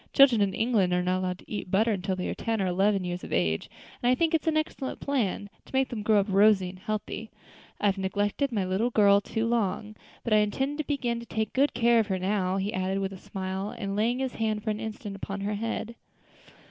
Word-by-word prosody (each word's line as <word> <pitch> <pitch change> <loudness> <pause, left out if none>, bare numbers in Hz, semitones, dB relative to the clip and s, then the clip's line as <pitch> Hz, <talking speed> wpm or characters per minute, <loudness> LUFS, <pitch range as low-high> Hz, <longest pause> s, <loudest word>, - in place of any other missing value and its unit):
Children 265 -6 +6
in 195 -2 +1
England 220 -6 +2
are 180 0 +2
not 185 +1 +1
allowed 180 -1 -2
to - - -18
eat 205 -3 -4
butter 220 +5 +3
until 190 -1 -1
they 180 - -3
are - - -2
ten 225 -1 -2
or 195 - +1
eleven 190 +2 +2
years 180 0 -4
of - - -8
age, 80 -2 0 0.3
and 245 - +2
I 255 - +5
think 330 +4 +1
it 325 0 +1
an 315 -1 +3
excellent 310 -3 -3
plan, 230 -8 -1 0.2
to - - -9
make 265 0 +2
them 230 -3 -4
grow 210 0 +4
up 195 - +1
rosy 195 -1 +4
and 185 0 -11
healthy. 215 +2 -4 0.5
I - - -1
have 195 -1 +2
neglected 205 +8 0
my 205 -5 0
little 190 +6 +1
girl 200 -3 +5
too 225 +2 -2
long, 215 -2 -1 0.3
but 235 - 0
I - - +7
intend 265 +8 0
to - - +1
begin 245 -5 -1
to 235 - -10
take 220 -1 -2
good 275 0 +2
care 235 0 +4
of 220 - +1
her 190 -2 0
now," 190 0 0
he 195 +2 -2
added, 185 +1 -1
with 195 0 -2
a - - -8
smile, 190 +2 -4
and 195 -1 -3
laying 230 +4 +1
his 265 -1 -2
hand 215 -2 -1
for 215 - 0
an 210 - -3
instant 215 -2 -6
upon 195 0 -5
her 205 +1 -1
head. 225 +2 -3
210 Hz, 245 wpm, -28 LUFS, 190-235 Hz, 0.5 s, I